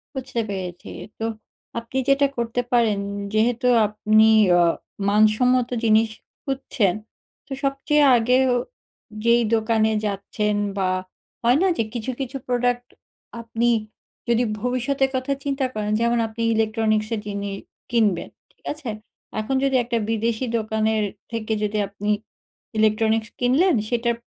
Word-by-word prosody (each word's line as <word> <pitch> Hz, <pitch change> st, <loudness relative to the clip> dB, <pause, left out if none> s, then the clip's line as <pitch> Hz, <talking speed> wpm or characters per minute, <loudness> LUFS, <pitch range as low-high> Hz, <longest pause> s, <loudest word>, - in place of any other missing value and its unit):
বুঝতে 260 Hz, -3 st, -3 dB
পেরেছি, 180 Hz, -3 st, -5 dB, 0.3 s
তো 225 Hz, -, -2 dB, 0.5 s
আপনি 235 Hz, +3 st, -6 dB
যেটা 280 Hz, +1 st, +4 dB
করতে 235 Hz, +1 st, -1 dB
পারেন, 220 Hz, -4 st, +3 dB, 0.3 s
যেহেতু 235 Hz, +3 st, +2 dB, 0.2 s
আপনি 215 Hz, +1 st, +3 dB, 0.3 s
আ -, -, +5 dB, 0.5 s
মানসম্মত 235 Hz, +4 st, +3 dB
জিনিস 220 Hz, 0 st, +4 dB, 0.3 s
খুঁজছেন, 255 Hz, -8 st, 0 dB, 0.5 s
তো -, -, -23 dB
সবচেয়ে 280 Hz, +2 st, +2 dB
আগে 250 Hz, +3 st, +3 dB, 0.2 s
ও -, -, +2 dB, 0.7 s
যেই 235 Hz, 0 st, +5 dB
দোকানে 220 Hz, 0 st, +2 dB
যাচ্ছেন 210 Hz, +1 st, -1 dB, 0.2 s
বা 190 Hz, -1 st, +1 dB, 0.5 s
হয় 245 Hz, +4 st, +4 dB
না? 385 Hz, -, +4 dB
যে 225 Hz, -, +2 dB
কিছু, 240 Hz, +2 st, -3 dB
কিছু 270 Hz, +1 st, -4 dB
প্রোডাক্ট 245 Hz, 0 st, 0 dB, 0.5 s
আপনি 230 Hz, +1 st, 0 dB, 0.6 s
যদি 235 Hz, +1 st, +3 dB, 0.2 s
ভবিষ্যতের 265 Hz, +2 st, 0 dB
কথা 260 Hz, +2 st, -2 dB
চিন্তা 275 Hz, -1 st, -1 dB
করেন, 210 Hz, -1 st, -2 dB
যেমন 235 Hz, 0 st, +2 dB
আপনি 220 Hz, +1 st, -7 dB
ইলেকট্রনিক্সের 220 Hz, 0 st, 0 dB
জিনি 200 Hz, 0 st, -4 dB, 0.4 s
কিনবেন, 215 Hz, -7 st, +1 dB, 0.2 s
ঠিক -, -, -34 dB
আছে? 295 Hz, -6 st, -7 dB, 0.5 s
এখন 240 Hz, +5 st, -1 dB
যদি 270 Hz, -1 st, +2 dB
একটা 235 Hz, 0 st, -1 dB
বিদেশি 225 Hz, +2 st, 0 dB
দোকানের 220 Hz, 0 st, 0 dB, 0.3 s
থেকে 225 Hz, -1 st, -2 dB
যদি 210 Hz, 0 st, -1 dB
আপনি 205 Hz, +1 st, -5 dB, 0.7 s
ইলেকট্রনিক্স 220 Hz, 0 st, +2 dB
কিনলেন, 270 Hz, +8 st, +3 dB
সেটাপ 235 Hz, -1 st, 0 dB
230 Hz, 125 wpm, -23 LUFS, 215-250 Hz, 0.7 s, আ